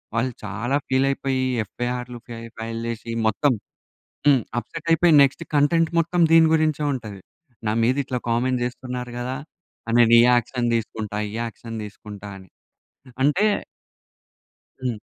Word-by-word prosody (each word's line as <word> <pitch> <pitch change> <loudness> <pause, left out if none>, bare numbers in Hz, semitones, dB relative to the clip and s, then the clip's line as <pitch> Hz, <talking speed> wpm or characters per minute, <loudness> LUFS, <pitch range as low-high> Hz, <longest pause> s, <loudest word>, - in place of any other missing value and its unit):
వాళ్ళు 125 +2 0
చాలా 120 +5 -2
ఫీల్ 130 +1 +2
అయిపోయి 135 -1 -1 0.2
ఎఫ్‌ఐఆర్ 125 +3 -4 0.5
ఫైల్ 115 0 -4
చేసి 115 0 -5 0.2
మొత్తం 135 +6 +2 0.7
హ్మ్. 140 -3 +6 0.2
అప్‌సెట్ 165 +8 -7
అయిపోయి 165 0 +4
నెక్స్ట్ 140 +4 +1
కంటెంట్ 160 +3 +3
మొత్తం 170 +2 +1
దీని 165 -1 +7
గురించే 155 -2 +1
ఉంటది. 110 -7 -6 0.5
నా 105 - +2
మీద 125 +3 +2
ఇట్లా 125 -1 -2
కామెంట్ 125 +2 +1
చేస్తున్నారు 125 0 -5
కదా! 125 +2 -3 0.6
నేను 115 0 +6
ఈ - - +7
యాక్షన్ 120 0 +1
తీసుకుంటా 110 -2 -4
ఈ - - -10
యాక్షన్ 115 0 -7
తీసుకుంటా 105 -1 -10
అని. 95 -2 -15 0.7
అంటే 150 +10 +3 1.4
హ్మ్. 120 -4 -1
125 Hz, 130 wpm, -23 LUFS, 115-140 Hz, 1.4 s, దీని